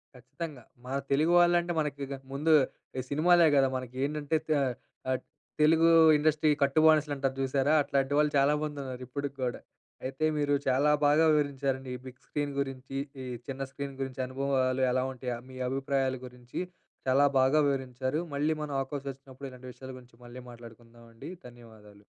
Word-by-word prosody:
ఖచ్చితంగా. 140 +1 -8 0.2
మన 130 +2 -3 0.2
తెలుగు 155 +5 +3
వాళ్ళు 175 0 +5
అంటే, 175 0 -3
మనకిక 140 -2 -3 0.2
ముందు 155 +4 +2 0.5
ఈ - - 0
సినిమాలే 170 +3 +5
కదా! 135 -1 +5
మనకి. 130 -1 -8
ఏంటంటే, 150 +1 -2
త - - -18 0.6
ఆహ్, 130 - 0 0.4
తెలుగూ 165 +2 +5 0.3
ఇండస్ట్రీ 155 +1 +2
కట్టు 140 +2 +2
బానిసలు 155 -2 +4
అంటారు 135 -1 -1
చూసారా? 135 +2 +1
అట్లాంటి 140 0 0
వాళ్ళు 150 0 +3
చాలా 140 +2 +4
మందున్నారు, 135 -4 -5
ఇప్పటికి 140 +1 -5
కూడా. 125 -2 -2 0.5
అయితే 135 +4 -2
మీరు 145 -1 +1
చాలా 135 +3 +3
బాగా 150 +3 +5
వివరించారండి. 135 -3 -1
ఈ 125 - -8
బిగ్ 130 0 -12
స్క్రీన్ 145 -1 -3
గురించి, 135 0 -4 0.3
ఈ - - -6 0.2
చిన్న 135 0 -5
స్క్రీన్ 140 0 -6
గురించి, 135 -1 -5
అనుభవాలు 130 -1 0
ఎలా 130 +1 +1
ఉంటాయ, 125 -1 -4
మీ 130 - -10
అభిప్రాయాల 135 0 0
గురించి 125 +4 -7 0.5
చాలా 135 +2 +4
బాగా 135 +4 +4
వివరించారు. 130 +1 -2
మళ్ళీ 150 +3 +1
మనం 150 -1 -5
అవకాశం 140 +1 -4
వచ్చినప్పుడు, 135 0 -11
ఇలాంటి 125 0 -11
విషయాల 130 +1 -10
గురించి 120 -1 -20
మళ్ళీ 120 +1 -10
మాట్లాడుకుందామండి. 115 +1 -13 0.2
ధన్యవాదాలు. 110 -4 -16
135 Hz, 155 wpm, -29 LUFS, 130-145 Hz, 0.6 s, వాళ్ళు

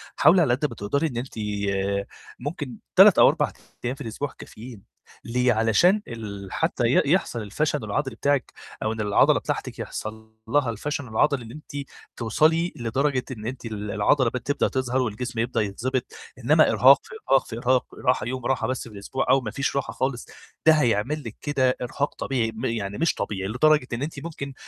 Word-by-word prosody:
حاولي 170 +5 +6
على 120 -6 +3
قد 140 +4 0
ما 120 - -9
تقدري 140 +11 0
إن 120 -5 -6
أنتِ 125 -1 -6 0.3
آآ 100 0 -1 0.3
ممكن 140 -3 -5 0.2
3 - - +8
أو - - +9
4 - - 0 0.3
أيام 125 +2 -1
في 145 - -13
الأسبوع 125 +3 -4
كافيين، 115 -2 -11 0.4
ليه؟ 125 +1 +2
علشان 115 - +3
ال 100 -4 -7
حتّى 160 -6 0
ي 120 - +4
يحصل 120 -11 0
الفشل 150 +8 -1
العضلي 135 -5 -2
بتاعِك، 140 +3 0 0.3
أو 110 - 0
إن 110 - -4
العضلة 105 -1 +4
بتاعتِك - - -4
يحصل 110 0 -7
لها 140 -2 +2
الفشل 140 +5 -3
العضلي 120 +4 +1
اللي 115 +2 -10
أنتِ 145 -2 -8 0.3
توصلي 160 +9 +2
لدرجة 130 +3 0
إن 110 -3 -7
أنتِ 125 0 -6
ال 105 -2 -5
العضلة 115 +5 +3
ب 125 - -3
تبدأ 140 +4 0
تظهر 130 -1 -1
والجسم 120 0 -3
يبدأ 120 +1 0
يتضبط، 120 +5 -2 0.3
إنما 150 +6 +4
إرهاق، 135 +2 +7
في - - -15 0.2
إرهاق، 135 - +5
في 115 - -6
إرهاق، 125 +1 +2 0.2
راحة 125 - +3
يوم 130 -1 -4
راحة 135 -1 0
بس 130 -1 -3
في - - -15
الأسبوع 130 +7 -3
أو 135 - +5
ما 110 - -5
فيش 140 +3 -2
راحة 140 - -2
خالص 130 -2 -2 0.4
ده 160 - +8
هيعمل 135 +1 +1
لِك 115 -2 -7
كده 130 -3 +1
إرهاق 140 +4 -2
طبيعي، 120 -4 -1
م 115 +4 -4
يعني 105 -4 -2
مش 165 - +2
طبيعي، 95 -1 -3
لدرجة 150 +3 +3
إن 120 - -3
أنتِ 150 -1 -5
ممكن 140 -4 -6
125 Hz, 190 wpm, -25 LUFS, 110-140 Hz, 0.4 s, أو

